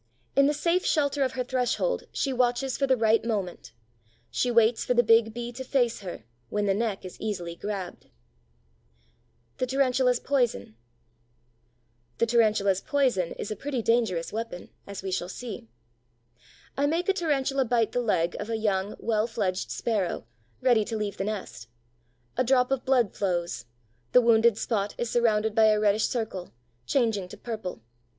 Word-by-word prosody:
In 275 0 +5
the 295 - +2
safe 340 +4 +1
shelter 285 -2 +1
of 260 -1 +1
her 255 - -1
threshold 260 - -1
she 270 - -1
watches 250 +1 +1
for 275 - 0
the 260 -1 +3
right 225 0 +3
moment; 195 - -3 0.6
she 250 - 0
waits 230 -1 +3
for 250 - 0
the 240 - +5
big 225 0 +4
Bee 240 +1 -5
to 255 +2 -7
face 245 -3 +1
her, 185 -3 -7 0.3
when 210 0 -1
the 195 - +3
neck 205 -2 -2
is 185 - -10
easily 175 -6 -3
grabbed. 195 -1 -6 1.5
THE 255 - 0
TARANTULA'S 255 -2 +2
POISON 240 - 0 1.4
The - - +3
Tarantula's 215 -5 +2
poison 255 - +1
is 210 - -6
a - - -2
pretty 260 +1 -3
dangerous 220 -8 +1
weapon, 225 -5 -5 0.2
as 200 -1 -7
we 190 - -3
shall 180 -1 -2
see. 205 - -7 1.1
I 285 +1 +1
make 330 +4 0
a 390 - +4
Tarantula 275 -7 +1
bite 230 -2 +1
the 245 - 0
leg 180 -7 +1
of 210 - -5
a 225 - 0
young, 205 -2 -1
well 220 -1 0
fledged 195 -5 -2
Sparrow, 205 - -1 0.4
ready 245 -4 +4
to 225 +1 -4
leave 210 -1 -3
the 195 - -2
nest. 200 - -5 0.7
A - - +3
drop 250 0 +3
of 270 -2 -1
blood 250 -6 +2
flows; 175 -10 -2 0.5
the 250 - +8
wounded 230 -2 +4
spot 205 -4 -1
is 240 -1 -2
surrounded 220 -2 +2
by 220 0 +5
a 215 -1 +4
reddish 210 0 +3
circle, 220 -7 -4 0.3
changing 220 - +1
to - - -11
purple. 210 - -6
230 Hz, 165 wpm, -27 LUFS, 200-250 Hz, 1.5 s, the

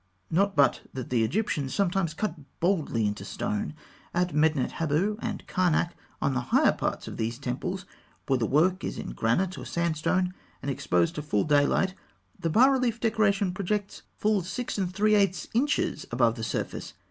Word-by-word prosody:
Not 195 +3 +2
but 140 -4 +4
that 130 -2 -5
the 120 -3 +3
Egyptians 140 - -1
sometimes 180 -4 +1
cut 205 -2 -1 0.3
boldly 160 - +1
into 105 0 -2
the - - -8
stone. 210 -5 -2 0.4
At 180 -1 +1
Medinet 150 -3 +2
Habû 165 +7 +1
and 225 -3 -4
Karnak 175 -2 +1 0.3
on 140 - +1
the 130 - +1
higher - - +5
parts - - -3
of - - -6
these 115 +1 -2
temples, 160 +9 -3 0.4
where 135 -2 +2
the 115 - +1
work 180 +6 +3
is - - -3
in - - -5
granite 175 - 0
or - - -7
sandstone, 170 +2 0 0.3
and 140 - -1
exposed 90 -9 +1
to 150 - -4
full 140 -9 +1
daylight 150 +5 +3 0.5
the 165 - -1
bas 240 - +6
relief 250 -4 +1
decoration 210 -5 +2
projects 200 +2 -2 0.2
full 210 -2 +2
6 205 +5 -4
3/8 200 +1 +2
inches 280 +6 0
above 120 -1 +3
the 115 - -6
surface. - - -4
175 Hz, 170 wpm, -27 LUFS, 140-200 Hz, 0.5 s, bas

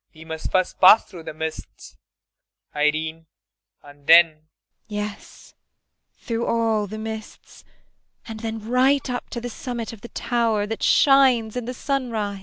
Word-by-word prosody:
] - - -40
We 160 +1 -13
must 160 -1 -6
first 185 -1 0
pass 190 +4 +8
through 170 -3 -12
the - - -6
mists, 160 0 -7 0.8
Irene, 155 +2 -1 0.6
and 145 0 -17
then 170 +1 +9
IRENE. 155 -1 -24 0.4
Yes, 210 -1 -7 0.6
through 230 0 -3
all 225 -2 +1
the 215 +3 -7
mists, 220 0 -8 0.6
and 220 -1 -7
then 220 -1 -5
right 260 +3 +2
up 245 - -5
to 240 - -5
the 240 - -6
summit 240 -1 -6
of 220 - -13
the 235 - -10
tower 230 -3 0
that 225 +1 -5
shines 260 -6 +4
in 245 -2 -3
the 250 +1 -5
sunrise. 230 -8 -2
220 Hz, 155 wpm, -23 LUFS, 170-235 Hz, 0.8 s, then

